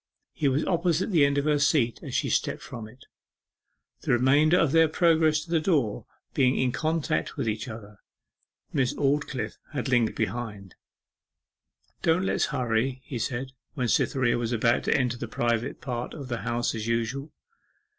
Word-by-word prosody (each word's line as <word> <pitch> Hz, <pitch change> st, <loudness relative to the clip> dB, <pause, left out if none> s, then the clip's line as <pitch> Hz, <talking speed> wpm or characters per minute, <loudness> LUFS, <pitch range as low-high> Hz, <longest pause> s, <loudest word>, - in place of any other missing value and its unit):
He 145 Hz, -, 0 dB
was 135 Hz, +3 st, +1 dB
opposite 175 Hz, +2 st, +1 dB
the 165 Hz, -6 st, +5 dB
end 140 Hz, 0 st, +2 dB
of 140 Hz, -, +1 dB
her 150 Hz, -1 st, +2 dB
seat 140 Hz, -5 st, +2 dB
as -, -, -6 dB
she -, -, +1 dB
stepped -, -, -1 dB
from 115 Hz, -3 st, -8 dB
it, 125 Hz, +4 st, -17 dB, 1.0 s
the -, -, -1 dB
remainder 140 Hz, +7 st, +4 dB
of 165 Hz, -6 st, +3 dB
their 165 Hz, +1 st, +5 dB
progress 160 Hz, -1 st, +3 dB
to 170 Hz, -, -12 dB
the 165 Hz, -, +3 dB
door 150 Hz, -, 0 dB, 0.3 s
being 130 Hz, -1 st, +3 dB
in 130 Hz, -1 st, +1 dB
contact 160 Hz, +3 st, -1 dB
with -, -, -2 dB
each 110 Hz, +3 st, -2 dB
other. 105 Hz, -3 st, -10 dB, 0.7 s
Miss 130 Hz, -4 st, +1 dB
Aldclyffe 135 Hz, -6 st, -1 dB
had 135 Hz, -2 st, -2 dB
lingered 120 Hz, -3 st, +2 dB
behind. 105 Hz, -3 st, -4 dB, 1.3 s
'Don't 170 Hz, +3 st, +2 dB
let's -, -, +1 dB
hurry,' 130 Hz, -1 st, -1 dB
he 125 Hz, -, -5 dB
said, 130 Hz, +3 st, -3 dB, 0.2 s
when 125 Hz, -4 st, -1 dB
Cytherea 120 Hz, 0 st, +2 dB
was 115 Hz, 0 st, -2 dB
about 115 Hz, +1 st, +2 dB
to -, -, +3 dB
enter 125 Hz, -2 st, 0 dB
the 120 Hz, -, -5 dB
private 120 Hz, +1 st, -1 dB
path 125 Hz, -1 st, -4 dB
to 145 Hz, -, -7 dB
the 125 Hz, -2 st, -4 dB
House 120 Hz, +1 st, -1 dB
as 110 Hz, -1 st, -4 dB
usual. 115 Hz, +6 st, -2 dB
130 Hz, 170 wpm, -27 LUFS, 115-150 Hz, 1.3 s, the